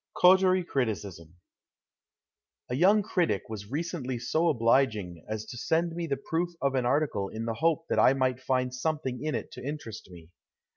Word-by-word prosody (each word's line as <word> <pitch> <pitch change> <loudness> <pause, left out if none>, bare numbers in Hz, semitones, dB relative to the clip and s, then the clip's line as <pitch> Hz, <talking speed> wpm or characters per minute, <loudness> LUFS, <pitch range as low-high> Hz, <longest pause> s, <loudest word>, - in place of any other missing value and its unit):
82 - - -7
COTERIE 185 0 +5
CRITICISM 100 - -3 1.4
A - - 0
YOUNG 200 +8 +4
critic 170 - 0
was 105 -2 -7
recently 145 -3 -3
so 155 +8 +1
obliging 115 - +1
as 110 0 -3
to 120 - -8
send 165 +4 0
me 170 -1 -3
the 140 -3 -1
proof 165 +5 -2
of 140 -1 0
an 125 -2 +1
article 125 -8 0
in 110 +1 -5
the 115 - -1
hope 165 +7 +1
that - - +1
I 130 - +6
might 130 -2 0
find 130 -1 0
something 130 -2 -2
in 155 -1 -1
it - - -5
to - - -9
interest 130 -8 -6
me. 85 -2 -13
130 Hz, 180 wpm, -28 LUFS, 110-160 Hz, 1.4 s, I